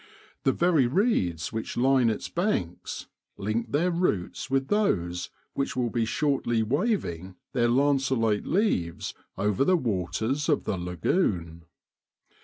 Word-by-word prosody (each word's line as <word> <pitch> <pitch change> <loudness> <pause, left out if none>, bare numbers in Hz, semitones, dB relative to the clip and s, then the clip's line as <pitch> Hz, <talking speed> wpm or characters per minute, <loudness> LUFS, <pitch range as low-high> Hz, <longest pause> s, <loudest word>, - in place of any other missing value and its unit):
The 135 - +5
very 165 -5 +3
reeds 120 - +1
which 110 0 -4
line 130 -1 +4
its 110 - -2
banks 170 - -2 0.3
link 110 +3 -2
their 170 +5 +2
roots 170 - -1
with 135 0 +1
those 90 - 0 0.2
which 140 - -2
will 120 -3 0
be 115 -2 +1
shortly 120 -2 +1
wav 185 - +1
ing 90 +2 -7 0.2
their 120 -3 +2
lanceolate 130 -5 +2
leaves 160 - 0 0.2
over 105 +4 +1
the 185 +5 +4
waters 115 - -1
of 150 - +2
the - - -1
lagoon. 85 - -1
120 Hz, 130 wpm, -27 LUFS, 95-145 Hz, 0.3 s, The